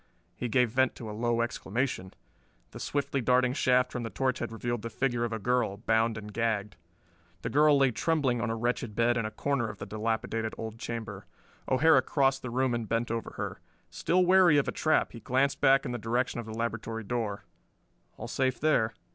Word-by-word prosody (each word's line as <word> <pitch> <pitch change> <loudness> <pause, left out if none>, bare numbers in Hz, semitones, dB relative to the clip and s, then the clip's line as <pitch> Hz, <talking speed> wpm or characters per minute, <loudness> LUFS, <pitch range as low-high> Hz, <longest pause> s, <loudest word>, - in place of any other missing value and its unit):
He 120 - -4
gave 125 0 +2
vent 130 +1 +2
to 110 -3 -7
a - - -6
low 115 +1 0
exclamation. 115 -4 -2 0.6
The - - -9
swiftly 140 -1 -1
darting 125 +1 +3
shaft 125 -1 +2
from 125 - -4
the 115 - -4
torch 130 0 -1
had 120 - -4
revealed 120 0 -3
the 115 - -5
figure 120 0 0
of 115 - -4
a 115 - -2
girl, 120 -2 0
bound 115 +1 +1
and 105 -1 -8
gagged. 105 -3 -1 0.7
The 115 - -3
girl 150 +1 +5
lay 135 -2 +4
trembling 135 -4 0
on 120 - -1
a 115 - -1
wretched 120 -1 -2
bed 120 +2 +3
in 115 -2 -1
a - - -4
corner 120 +1 -1
of 105 - -8
the - - -6
dilapidated 110 0 -2
old 110 0 -6
chamber. 110 -4 -6 0.4
O'Hara 160 +5 +5
crossed 135 -2 +1
the 125 - -5
room 130 +1 +1
and 115 -2 -3
bent 115 0 0
over 115 -1 -4
her. 100 -3 -5 0.3
Still 180 - +2
wary 180 -4 +6
of 145 - +2
a - - 0
trap 155 - +1
he 115 - -9
glanced 135 +4 0
back 135 +1 +5
in 125 - -3
the 120 - -3
direction 120 +3 -1
of 115 - -6
the 110 - -6
laboratory 115 -1 -3
door: 105 -2 -3 0.7
all - - -6
safe 130 -1 0
there. 115 -8 +2
120 Hz, 205 wpm, -29 LUFS, 110-130 Hz, 0.7 s, wary